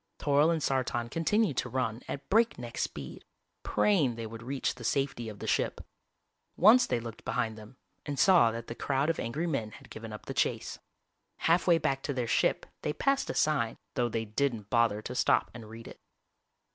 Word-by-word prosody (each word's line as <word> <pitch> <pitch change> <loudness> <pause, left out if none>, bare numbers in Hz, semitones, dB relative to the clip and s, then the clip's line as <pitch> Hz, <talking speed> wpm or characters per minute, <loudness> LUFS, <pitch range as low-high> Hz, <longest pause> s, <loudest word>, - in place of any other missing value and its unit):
Toryl 145 +2 +3
and 160 -3 -1
Sartan 120 -3 -1
continued 165 - +1
to - - -1
run 125 -3 -2
at 140 - -6
breakneck 195 - +1
speed, 70 -3 -5 0.4
praying 155 - +2
they 115 0 -5
would 115 +1 -8
reach 130 +3 -2
the 120 - -11
safety 135 -2 -1
of 105 - -9
the - - -7
ship. - - 0 0.8
Once 230 +6 +7
they 125 - 0
looked 115 -1 -8
behind 110 -1 -1
them 110 +3 -13 0.3
and 145 -1 -3
saw 175 -10 +6
that 115 0 -5
the 115 - -6
crowd 140 +5 0
of 165 - -6
angry 145 +9 -2
men 115 -10 -2
had - - -14
given 110 0 -8
up 105 - -9
the - - -5
chase. - - -1 0.6
Halfway 170 +1 +4
back 135 -4 -1
to 140 - -3
their 125 -2 -1
ship 115 - +1 0.2
they 150 - -1
passed 275 - 0
a - - -3
sign, 125 -7 +1 0.2
though 120 -1 0
they 115 0 -2
didn't 110 -2 -2
bother 115 -3 +2
to 125 - -5
stop 125 - +2
and 115 -3 -10
read 115 +1 -10
it. - - -12
125 Hz, 195 wpm, -30 LUFS, 115-150 Hz, 0.8 s, Once